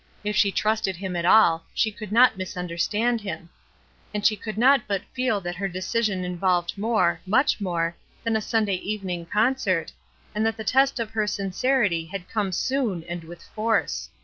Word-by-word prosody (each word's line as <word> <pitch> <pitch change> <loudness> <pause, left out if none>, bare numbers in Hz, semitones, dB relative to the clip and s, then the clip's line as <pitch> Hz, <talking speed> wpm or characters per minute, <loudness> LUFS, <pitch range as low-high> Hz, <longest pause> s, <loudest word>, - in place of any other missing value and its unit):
If 210 0 -2
she 200 0 +4
trusted 215 -2 0
him 185 0 -5
at 170 0 -1
all, 165 -6 +5
she 220 - +2
could 210 0 -9
not 245 +3 +6
misunderstand 185 +6 -1
him; 175 -3 -6 0.6
and 205 - -2
she 215 - +5
could 215 +1 -7
not 260 +1 +4
but 200 -2 -1
feel 250 -5 0
that 175 0 -5
her 195 +1 -1
decision 185 +1 -1
involved 180 -1 0
more, 200 -6 +1
much 250 +3 +2
more, 170 -3 -1 0.3
than 230 -1 0
a 220 - +1
Sunday 215 -3 0
evening 185 -4 -4
concert, 210 -5 +1 0.4
and 210 - 0
that 225 0 0
the 220 - -5
test 270 +3 +3
of 225 -2 -3
her 215 -1 0
sincerity 200 -2 0
had 180 +2 -7
come 205 -4 -1
soon 220 -3 -1
and 175 0 -6
with 170 +1 -11
force. 220 +1 -1
205 Hz, 175 wpm, -25 LUFS, 180-225 Hz, 0.6 s, not